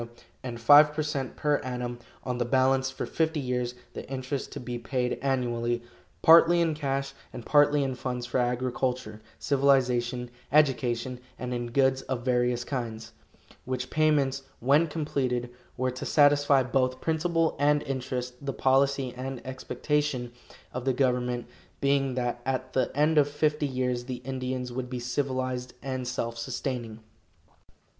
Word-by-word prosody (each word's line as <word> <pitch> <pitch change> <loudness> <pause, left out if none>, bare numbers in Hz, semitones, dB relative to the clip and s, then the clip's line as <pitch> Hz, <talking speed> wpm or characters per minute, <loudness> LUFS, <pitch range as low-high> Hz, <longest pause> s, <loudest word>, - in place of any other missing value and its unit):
and 120 -2 -6
five 145 +5 +8
per 155 - 0
cent 140 -3 -3
per 150 -1 +1
annum 125 -1 -4 0.2
on 125 -1 -3
the - - +2
balance 130 +2 +2
for 135 - -5
fifty 160 -1 0
years, 125 -2 -2 0.2
the - - -8
interest 135 +1 -4
to - - -6
be 120 -1 -5
paid 125 +1 -2
annually, 120 -3 0 0.4
partly 170 +1 +7
in 165 -2 +2
cash 140 -2 -2 0.2
and 120 - -8
partly 145 -1 +4
in 135 -1 -1
funds 125 -1 -4
for 125 - -1
agriculture, 125 -2 -1 0.2
civilization, 125 -3 +1 0.2
education, 130 -4 +2 0.2
and 125 0 -4
in 120 0 -3
goods 130 +1 +2
of 125 -2 -2
various 125 -1 +1
kinds; 115 -4 -5 0.5
which 130 0 -4
payments, 145 -3 +2 0.2
when 145 +7 +4
completed, 130 -6 -2 0.3
were 130 0 0
to 125 - -7
satisfy 145 -2 +4
both 130 0 0
principal 165 0 +1
and 145 +1 +3
interest, 125 -1 -4
the 135 -1 -2
policy 135 0 +2
and 130 0 -5
expectation 130 0 -2 0.4
of 125 - -4
the 130 0 +1
government 125 -2 0 0.3
being 140 -2 +1
that 120 -1 -2
at 130 0 -2
the 130 - +1
end 150 +1 +4
of 145 0 +3
fifty 150 0 0
years 125 -2 -1
the 130 0 -4
Indians 130 -1 -3
would 125 0 -4
be 125 -1 -4
civilized 130 0 -2
and 130 -1 -3
self 115 -2 -3
sustaining. 120 -2 -4
130 Hz, 150 wpm, -28 LUFS, 125-140 Hz, 0.5 s, five